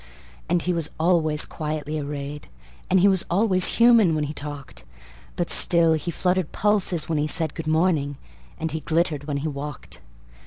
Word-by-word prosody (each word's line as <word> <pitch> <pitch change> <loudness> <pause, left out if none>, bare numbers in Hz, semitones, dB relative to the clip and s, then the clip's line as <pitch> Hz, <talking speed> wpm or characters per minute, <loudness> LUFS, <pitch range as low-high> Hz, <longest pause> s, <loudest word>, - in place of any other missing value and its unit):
And 175 0 +1
he 180 - 0
was 165 -3 -2
always 160 -3 +2
quietly 155 0 -4
arrayed, 145 0 -6 0.4
And 190 -1 +4
he 200 - +6
was 190 -3 +3
always 185 0 +2
human 230 -8 +5
when 155 - -1
he 150 +1 -4
talked; 145 - -8 0.5
But - - -2
still 170 -2 +4
he 160 +2 -2
fluttered 180 -1 -1
pulses 195 -6 +1
when 160 -2 -1
he 150 - 0
said, 160 -1 0
"Good 165 -2 -7
morning," 155 -3 +1 0.4
and 160 -1 -3
he 160 - -3
glittered 155 -2 -1
when 145 -1 -2
he - - 0
walked. 145 -1 -7
160 Hz, 170 wpm, -23 LUFS, 150-180 Hz, 0.5 s, he